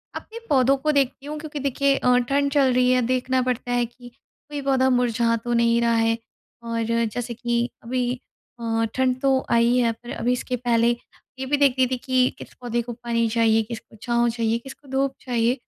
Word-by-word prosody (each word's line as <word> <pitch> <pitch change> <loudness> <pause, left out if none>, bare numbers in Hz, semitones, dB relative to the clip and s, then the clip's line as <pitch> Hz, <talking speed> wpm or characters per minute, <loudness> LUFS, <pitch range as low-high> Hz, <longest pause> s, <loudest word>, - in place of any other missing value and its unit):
अपने 455 +1 -8
पौधों 270 -1 +4
को 305 +3 0
देखती 275 -1 0
हूँ 300 +1 -5
क्योंकि 300 -1 -6
देखिए 275 0 +1
अ, 250 0 +3
ठंड 275 +3 +1
चल 275 -3 +3
रही 250 0 +3
है 255 0 +3
देखना 255 +1 +1
पड़ता 250 -1 -2
है 245 0 +2
कि 245 +1 -14
कोई 285 +3 -11
पौधा 265 -1 +2
मुरझा 235 -2 +2
तो 240 0 -1
नहीं 235 0 +3
रहा 235 0 +2
है। 225 0 +2 0.5
और 230 0 -2 0.3
जैसे 245 -1 -3
कि 240 +1 -1
अभी 245 +1 -1 0.5
अ, 225 -1 0
ठंड 255 -1 +1
तो 265 -1 +2
आई 235 +1 +4
है 235 -2 +3
पर 240 +2 -10
अभी 245 +1 0
इसके 250 0 -2
पहले 235 -1 +2 0.5
ये 265 - -3
भी 290 +2 +1
देखती 265 -2 +4
थी 255 - -2
कि 255 0 +2
किस - - -11
पौधे 240 -1 -1
को 240 0 -6
पानी 230 -1 -1
चाहिए? 225 0 +3
किसको 225 0 -9
छाँव 235 0 +1
चाहिए? 230 -1 0
किसको 270 +2 -13
धूप 270 0 0
चाहिए? 240 -1 +1
245 Hz, 200 wpm, -23 LUFS, 235-265 Hz, 0.5 s, पौधों